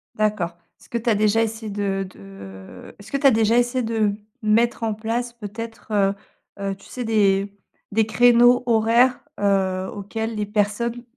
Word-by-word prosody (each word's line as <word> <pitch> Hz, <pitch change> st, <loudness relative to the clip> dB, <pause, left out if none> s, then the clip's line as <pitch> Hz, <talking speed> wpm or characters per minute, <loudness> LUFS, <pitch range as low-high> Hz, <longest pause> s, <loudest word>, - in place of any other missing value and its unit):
D'accord. 205 Hz, -6 st, -1 dB, 0.2 s
Est-ce -, -, -19 dB
que 235 Hz, -, -2 dB
tu 235 Hz, +1 st, -1 dB
as 215 Hz, -, +3 dB
déjà 215 Hz, +2 st, +2 dB
essayé 220 Hz, 0 st, -4 dB
de 195 Hz, -1 st, -2 dB
de 95 Hz, -, -12 dB
est-ce 205 Hz, +2 st, -13 dB
que 275 Hz, -, 0 dB
tu 275 Hz, -, +4 dB
as -, -, +7 dB
déjà 225 Hz, +1 st, +3 dB
essayé 245 Hz, +1 st, +1 dB
de, 225 Hz, 0 st, -2 dB
mmh, 205 Hz, -1 st, +2 dB, 0.3 s
mettre 230 Hz, +2 st, +2 dB
en 220 Hz, -1 st, 0 dB
place 235 Hz, +3 st, -3 dB
peut-être, 225 Hz, +1 st, -8 dB
heu 200 Hz, -2 st, +2 dB, 0.5 s
heu, 195 Hz, -1 st, -2 dB
tu 195 Hz, -, -19 dB
sais 250 Hz, -, -6 dB
des 200 Hz, -3 st, +2 dB, 0.4 s
des 220 Hz, +1 st, +2 dB
créneaux, 245 Hz, +2 st, +5 dB
horaires, 235 Hz, +2 st, +3 dB, 0.2 s
heu, 190 Hz, -2 st, +1 dB
auxquels 220 Hz, +3 st, -4 dB
les 210 Hz, -1 st, -2 dB
personnes, 215 Hz, +3 st, -1 dB
220 Hz, 175 wpm, -22 LUFS, 200-235 Hz, 0.5 s, as